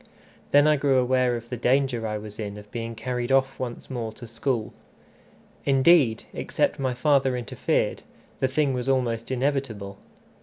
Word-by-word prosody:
Then 145 +1 +6
I 155 0 +4
grew 135 -1 +2
aware 125 -1 +2
of 120 0 -7
the 125 - -4
danger 125 -1 +1
I 105 0 -2
was 105 0 -9
in 105 -1 -5
of 105 0 -13
being 115 -1 -5
carried 125 +2 -3
off 135 0 +2
once 120 -2 -5
more 120 -4 -4
to 120 - -11
school. 115 0 -2 0.9
Indeed, 135 -3 +4
except - - -1
my 130 -2 -1
father 135 -1 +2
interfered, 120 -4 -1 0.4
the 130 - +2
thing 135 +1 +1
was 125 +1 -2
almost 120 -4 0
inevitable. 125 -7 -2
125 Hz, 160 wpm, -25 LUFS, 115-135 Hz, 0.9 s, Then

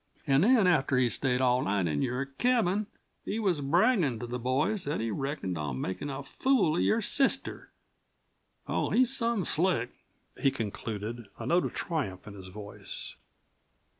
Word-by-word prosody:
An' 135 -1 +3
then 225 +1 +5
after 150 -7 +3
he'd 125 -1 +3
stayed 125 +2 +1
all 125 0 +3
night 100 -4 0
in 75 -3 -1
your 125 +3 -1
cabin 210 - +1 0.4
he 210 - -3
was 190 -9 +1
braggin' 165 - +2
to 120 - -4
the 125 +1 -4
boys 135 - 0
that 145 - -2
he 115 0 -2
reckoned 135 - -3
on 70 -4 -3
makin' 95 - -4
a 140 0 -5
fool 205 - +1
of - - +2
your 225 - +2
sister. 270 +5 0 1.0
Oh, - - 0
he's 255 +1 +3
some 230 -6 0
slick!" 160 -8 +2 0.5
he 135 - +5
concluded, 110 0 -5
a - - -6
note 175 +1 +2
of - - -5
triumph 135 - -3
in 105 - -9
his 95 -2 -10
voice. 100 +2 -6
135 Hz, 165 wpm, -29 LUFS, 115-185 Hz, 1.0 s, then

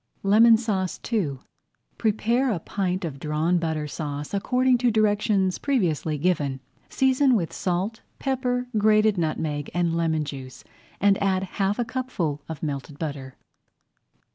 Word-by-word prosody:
LEMON 220 +3 +6
SAUCE 200 -5 -2
II 155 -12 0 0.6
Prepare 230 +4 +1
a 190 - -1
pint 185 +1 -2
of 140 -4 -6
Drawn 155 +4 +1
Butter 160 -2 -2
Sauce 145 0 -5
according 250 +5 +2
to 245 0 +3
directions 205 -3 +2
previously 170 - 0
given, 145 -5 0 0.3
season 265 0 +3
with 175 -7 -1
salt, 190 +5 -2 0.2
pepper, 250 -2 -1
grated 215 -1 +4
nutmeg, 155 -2 -2
and 170 -2 +1
lemon 160 -2 0
juice, 135 -3 -8 0.4
and 200 -1 +3
add 190 -1 +1
half 195 +1 -1
a 240 - 0
cupful 225 - -3
of 160 -1 -7
melted 140 -1 -4
butter. 140 -4 -5
185 Hz, 135 wpm, -25 LUFS, 155-220 Hz, 0.6 s, LEMON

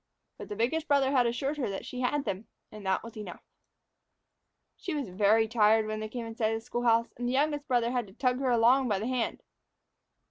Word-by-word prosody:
But - - -8
the 205 - -4
biggest 300 +9 0
brother 280 -2 +3
had 250 -3 +3
assured 270 +5 -2
her 260 -7 -1
that 195 - -5
she 255 - -6
had 280 +3 0
them, 195 +3 -4 0.2
and 215 -1 -10
that 190 - +1
was 230 0 -10
enough. 210 -5 -8 1.3
She 355 - -5
was 280 -8 -3
very 210 +4 +3
tired 220 -1 +4
when 215 0 -3
they 215 0 -5
came 235 +1 -5
in 225 - -7
sight 220 -1 +1
of - - -3
the - - -16
school 240 -1 -3
house, 230 0 +3
and 245 0 -3
the - - -1
youngest 290 +1 0
brother 240 -2 +1
had 245 -4 -1
to 190 - -15
tug 250 +2 0
her 265 -1 0
along 245 +3 +4
by 205 -4 +1
the 210 - -3
hand. 250 -1 -2
235 Hz, 235 wpm, -29 LUFS, 215-260 Hz, 1.3 s, tired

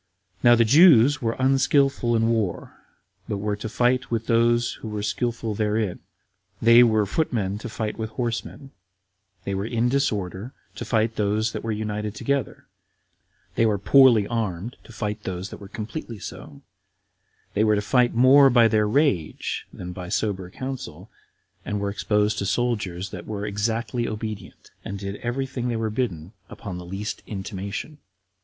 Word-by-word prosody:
Now 120 -1 +7
the 115 0 +4
Jews 145 0 +6
were 115 -1 -1
unskillful 135 -2 +2
in 115 0 +2
war, 110 -6 -1 0.6
but 100 - -1
were 105 +1 -2
to 110 +1 -5
fight 125 +1 +1
with 115 -1 -2
those 120 +1 +2
who - - -6
were 105 -1 -4
skillful 115 +1 -2
therein; 105 -2 -1 0.6
they 115 +1 +7
were 110 -3 +4
footmen 105 - -1
to 120 - -7
fight 110 0 -4
with 110 0 -3
horsemen; 120 +4 -4 0.7
they 100 - -3
were 100 +2 -2
in 120 +1 +1
disorder, 110 -4 -1 0.2
to - - -5
fight 110 -1 0
those 105 +2 +1
that - - -6
were 115 - -2
united 105 0 -3
together; 140 +5 -2 0.9
they - - +1
were 105 -2 +1
poorly 120 +1 +5
armed, 110 -1 -3
to - - -13
fight 105 -1 -4
those 95 -1 -5
that - - -7
were 100 - -9
completely 115 +3 -6
so; 75 -6 -10 0.9
they 105 - +2
were 110 -1 +3
to 105 - 0
fight 125 +2 +2
more 135 +3 +7
by 120 -2 +5
their 110 -1 +2
rage 105 - 0
than 90 0 -7
by 90 -1 -7
sober 95 -3 -2
counsel, 130 +6 -7 0.5
and 105 - -3
were 100 0 -2
exposed 105 0 0
to 100 - -2
soldiers 100 -5 -1
that - - -8
were 105 -1 -4
exactly 115 +3 -2
obedient; 110 -1 -7
and 100 - -5
did 100 +1 -5
every 125 +3 -2
thing 125 -2 -4
they 120 - -1
were 110 -1 -2
bidden 100 -7 -3 0.2
upon 90 -3 -7
the 90 - -9
least 95 +4 -5
intimation. 100 +8 -6
110 Hz, 165 wpm, -24 LUFS, 100-120 Hz, 0.9 s, Now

